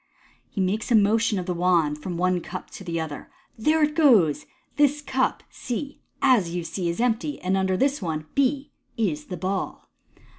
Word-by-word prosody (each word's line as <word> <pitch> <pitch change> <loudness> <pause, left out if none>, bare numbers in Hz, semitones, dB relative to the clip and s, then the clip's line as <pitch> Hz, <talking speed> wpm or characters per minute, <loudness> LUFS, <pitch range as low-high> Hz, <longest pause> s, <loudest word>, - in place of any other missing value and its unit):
He - - -6
makes 210 +6 -1
a - - +6
motion 220 +1 +3
of 180 - -3
the 180 - -1
wand 170 -4 +1
from 180 +3 -4
the - - -5
one 185 -1 +2
cup 180 +2 -8
to - - -9
the 170 -2 -3
other. 155 -3 -6
'* - - -36
There 310 +7 +3
it 300 0 +2
goes! 235 - +4 0.3
This 295 0 +3
cup 265 -3 -1
(C), 275 +4 -5 0.2
as 210 -11 +3
you 175 - -2
see, 175 +1 -3
is 170 - -3
empty, 245 +5 0
and 185 +1 0
under 190 -1 +1
this 275 +2 +1
one 155 -4 -3
(B) 275 +1 +1 0.3
is 160 -10 -1
the 180 - -6
ball. 190 +3 -3
195 Hz, 195 wpm, -25 LUFS, 175-260 Hz, 0.3 s, a